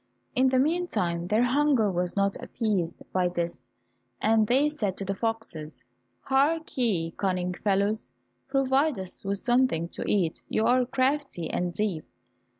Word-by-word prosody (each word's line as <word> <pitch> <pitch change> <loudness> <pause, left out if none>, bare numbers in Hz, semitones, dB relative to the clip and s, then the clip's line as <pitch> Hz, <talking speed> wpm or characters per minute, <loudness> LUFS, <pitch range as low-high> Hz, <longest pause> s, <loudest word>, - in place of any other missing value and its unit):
In 260 -1 +4
thu 260 - +2
meantime 255 - 0
their 215 +5 +3
hunger 255 -4 +3
was 180 0 -1
not 200 -1 +1
appeased 195 -7 -2
by 185 -1 +2
this, 175 -1 -3 0.6
and 220 0 +3
they 270 +6 +4
said 215 -11 -2
to 195 - -4
the 195 - -1
foxes, 160 - -4 0.4
"Hark 305 +5 +1
ye, 195 -10 0
cunning 180 -1 -1
fellows, 200 -4 0 0.4
provide 270 +1 +2
us 190 -1 -6
with 200 0 -1
something 240 -8 +1
to - - -5
eat. 180 -6 +1
You 220 - +1
are 250 +1 +3
crafty 265 - 0
and 180 0 -1
deep." 185 -4 -2
210 Hz, 150 wpm, -27 LUFS, 180-260 Hz, 0.6 s, In